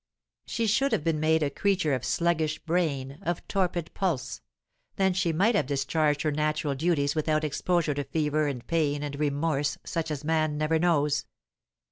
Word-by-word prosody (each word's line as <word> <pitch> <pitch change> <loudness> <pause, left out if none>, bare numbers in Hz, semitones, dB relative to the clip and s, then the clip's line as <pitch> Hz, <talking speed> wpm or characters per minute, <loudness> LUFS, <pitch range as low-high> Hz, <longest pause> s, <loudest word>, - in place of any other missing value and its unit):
She 230 - -1
should 245 +5 +2
have 200 - +1
been 160 -2 0
made 160 0 +3
a 140 - 0
creature 190 -2 +1
of 130 -2 -1
sluggish 160 -1 +1
brain, 145 -5 -1
of 175 0 -3
torpid 175 -4 -1
pulse; 170 -9 -2 0.5
then 190 -1 +2
she 180 -2 +1
might 195 +9 +3
have 155 - +1
discharged 145 +2 +1
her 155 - +1
natural 150 0 0
duties 145 -1 +1
without 155 0 0
exposure 160 +1 0
to 145 0 -2
fever 150 0 0
and 130 -4 -4
pain 150 -3 0
and 145 -1 -5
remorse 145 -1 0
such 165 -2 -3
as 150 -2 -4
man 155 -1 +1
never 155 +1 +1
knows. 150 -4 +2
155 Hz, 170 wpm, -27 LUFS, 145-170 Hz, 0.5 s, made